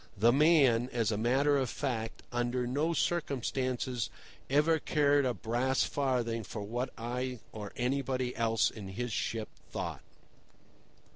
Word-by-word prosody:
The 115 +4 +5
man, 135 -5 +5
as 115 -2 +1
a - - 0
matter 135 +6 +3
of 130 -3 0
fact, 115 -6 -3
under 120 +1 0
no 145 +7 0
circumstances, 130 -7 -1 0.4
ever 150 +4 +4
cared 145 -2 +3
a 125 - +1
brass 125 +4 +1
farthing 120 -5 0
for 105 +1 -6
what 120 +5 -2
I 125 +2 -3
or 105 -2 -7
anybody 130 0 -1
else 115 -5 +2
in 105 -3 -8
his 115 +4 -4
ship 110 0 -2 0.2
thought. - - -4
125 Hz, 135 wpm, -31 LUFS, 115-135 Hz, 0.4 s, The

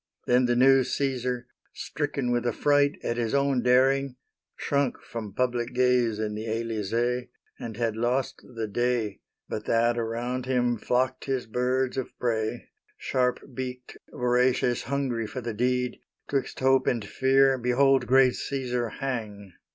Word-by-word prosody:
Then 125 +1 +3
the 120 0 +2
new 135 +1 +6
Caesar, 125 -3 -2 0.3
stricken 140 -4 -3
with 120 0 0
affright 145 +4 +2
At 120 - -2
his 120 +2 0
own 140 -2 +2
daring, 130 +2 +3 0.4
shrunk 140 -3 0
from 110 -3 -6
public 125 -1 -1
gaze 125 -3 +3
In 105 -1 -2
the 110 +2 -5
Elysee, 115 +2 -1 0.3
and 110 -2 -6
had 115 -2 -1
lost 120 +3 -1
the 115 -1 -2
day 115 -2 -1 0.3
But 105 - -5
that 115 +1 +2
around 120 +3 -3
him 120 -3 +1
flocked 130 +3 0
his 130 -2 -1
birds 125 +3 0
of 130 - -4
prey, 115 -1 -2 0.3
Sharp 125 -1 0
beaked, 125 -1 -6 0.2
voracious, 125 0 +1
hungry 125 -4 -1
for 130 - -6
the 115 -1 -4
deed. 125 +2 0 0.3
'Twixt 135 -1 -2
hope 130 0 +3
and 115 -4 0
fear 135 +3 +3
behold 130 +3 +3
great 130 0 +5
Caesar 125 -3 -2
hang! 105 -8 -5
125 Hz, 145 wpm, -27 LUFS, 115-130 Hz, 0.4 s, new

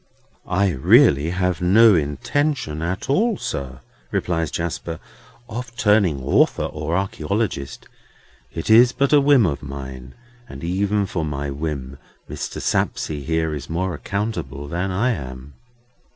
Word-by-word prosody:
"I 95 +2 +2
really 70 +1 +4
have 90 -1 -1
no 105 +5 +6
intention 80 - -1
at 85 +3 -3
all, 210 - +2
sir," 65 -2 -5 0.3
replies 85 -2 -1
Jasper, 85 -1 -4 0.5
"of 120 +1 -7
turning 105 - +2
author - - +2
or 75 +2 -3
archæologist. 95 - -2 0.7
It 80 - -5
is 120 +2 +7
but 140 +1 +1
a 145 - +7
whim 140 -5 +5
of 75 -4 -2
mine. 65 -2 -8 0.3
And - - -9
even 100 +4 0
for 90 -3 -3
my 70 -2 -3
whim, 70 -2 -5 0.3
Mr. - - -5
Sapsea 75 -2 -1
here 80 +1 -1
is 75 - -6
more 90 +2 -1
accountable 75 - -4
than 90 +5 -2
I 105 +8 +1
am." 65 - -7
85 Hz, 135 wpm, -21 LUFS, 70-105 Hz, 0.7 s, is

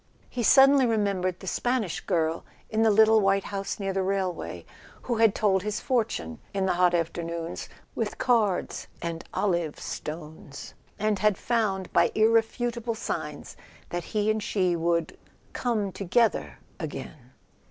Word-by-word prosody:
He 245 - -3
suddenly 270 +2 +6
remembered 200 -5 0
the - - -9
Spanish 235 -2 -1
girl 165 -3 -1 0.3
in 220 0 +1
the 225 - +5
little 220 +1 +6
white 195 0 +2
house 200 0 -4
near 195 -1 -2
the 190 - 0
railway, 190 -2 -2 0.4
who 240 -2 -1
had 225 -2 +4
told 195 -3 +2
his 210 +1 -2
fortune 220 - -1 0.2
in 195 -1 +1
the 190 - +2
hot 175 0 +3
afternoons 170 0 -3 0.2
with - - -3
cards 220 -7 +1
and 165 -1 -4
olive 170 -6 -1
stones, 150 -2 -7 0.2
and 210 -1 0
had 210 -2 +3
found, 205 -6 -1
by 170 - +4
irrefutable 230 +1 +1
signs, - - -5 0.3
that 175 -1 -4
he 215 -1 +1
and 215 0 -1
she 185 -4 +1
would 170 -1 -1 0.3
"come 215 -5 -1
together" 205 +5 +1 0.2
again. 135 -5 -7
195 Hz, 140 wpm, -27 LUFS, 175-220 Hz, 0.4 s, suddenly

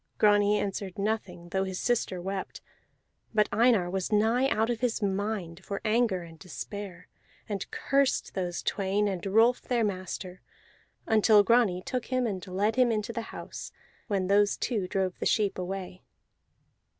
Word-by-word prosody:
Grani 205 0 +4
answered 195 -2 -3
nothing, 200 -4 -3
though 190 +2 0
his 190 -1 -4
sister 230 -6 0
wept; 190 +2 -4 0.8
but 210 -1 +4
Einar 220 -3 +4
was 190 +2 -2
nigh 225 +5 +3
out 225 0 +1
of 235 - -2
his 240 -1 0
mind 195 -3 -2
for 200 0 -4
anger 215 -5 +2
and 165 -1 -13
despair, 185 0 -7 0.4
and 200 -3 -4
cursed 275 -1 +1
those 180 -2 -3
twain, 200 +1 0
and 190 -3 -3
Rolf 225 +5 +4
their 240 -2 0
master, 185 -2 -4 0.6
until 215 -2 +5
Grani 205 -5 +3
took 250 +1 -3
him 255 -1 0
and 190 -5 -3
led 205 +5 0
him 250 -2 +4
into 215 +1 -2
the 230 - -2
house, - - -8 0.4
when 195 -4 0
those 205 +2 +3
two 210 -7 -1
drove 190 -1 -1
the - - 0
sheep 205 -4 +1
away. 185 0 -5
205 Hz, 155 wpm, -28 LUFS, 185-225 Hz, 0.8 s, until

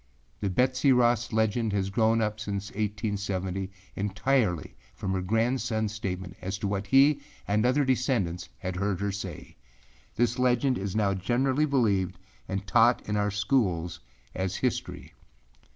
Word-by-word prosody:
The 100 - -1
Betsey 130 +7 +3
Ross 120 -2 +3
legend 110 0 +1
has 100 -1 0
grown 115 +2 +3
up 105 0 -1
since 100 -1 -4
1870 100 -3 -2 0.3
entirely 105 - 0 0.2
from 95 - -3
her 95 - 0
grandsonâs 110 +1 0
statement 95 -4 -5
as 95 +2 -3
to 105 -1 -2
what 100 0 -2
he 140 +5 +5 0.3
and 105 +1 +2
other 140 +3 +3
descendants 120 -9 0
had 90 +7 -4
heard 100 -1 -1
her 100 0 -1
say. 95 -4 -7 0.6
This 120 +2 +1
legend 125 +1 +2
is 100 0 -4
now 100 -2 +2
generally 130 +9 +1
believed 105 -10 +1 0.3
and 95 +1 -3
taught 115 +6 +3
in 105 - -1
our 105 0 +1
schools 95 - 0 0.3
as 95 -1 -2
history. - - -3
105 Hz, 145 wpm, -28 LUFS, 95-120 Hz, 0.6 s, he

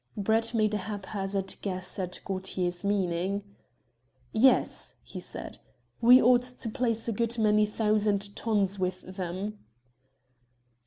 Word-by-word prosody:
Brett 225 +3 +1
made 215 -1 +2
a - - +1
haphazard 195 -1 -3
guess 185 -1 -3
at 180 -1 -4
Gaultier's 185 -2 -2
meaning. 195 0 0 0.9
"Yes," 260 +4 +3
he - - -8
said, - - -5 0.4
"we 245 +2 +8
ought 245 0 +5
to 250 -1 -4
place 230 -1 -1
a - - +1
good 235 +2 0
many 215 -1 +3
thousand 210 -2 +1
tons 205 -3 0
with 185 0 -2
them." 185 +3 -5
205 Hz, 120 wpm, -28 LUFS, 190-225 Hz, 0.9 s, we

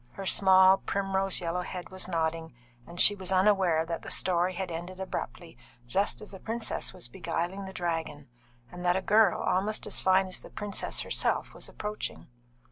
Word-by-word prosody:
Her 195 - -7
small, 190 0 +6
primrose 195 -1 -1
yellow 175 +1 -2
head 180 0 -7
was 185 -1 -3
nodding, 160 -4 -2 0.3
and 170 +1 -9
she 205 - +8
was 190 -2 -4
unaware 185 -4 +3
that 165 0 -4
the - - -8
story 180 0 +2
had 185 0 -4
ended 175 +3 -6
abruptly 120 -10 -6 0.3
just 195 - 0
as 210 - -9
the 190 - -9
princess 225 +2 -3
was - - -7
beguiling 175 +6 -3
the 190 - -7
dragon, 165 -5 -3 0.4
and 180 0 -8
that 175 0 +3
a 190 - 0
girl 210 -1 +4
almost 205 +4 0
as - - -2
fine 190 0 +4
as 185 -1 -3
the - - -13
princess 205 -1 -3
herself - - 0
was - - -8
approaching. 210 -8 -5
185 Hz, 180 wpm, -29 LUFS, 170-195 Hz, 0.4 s, she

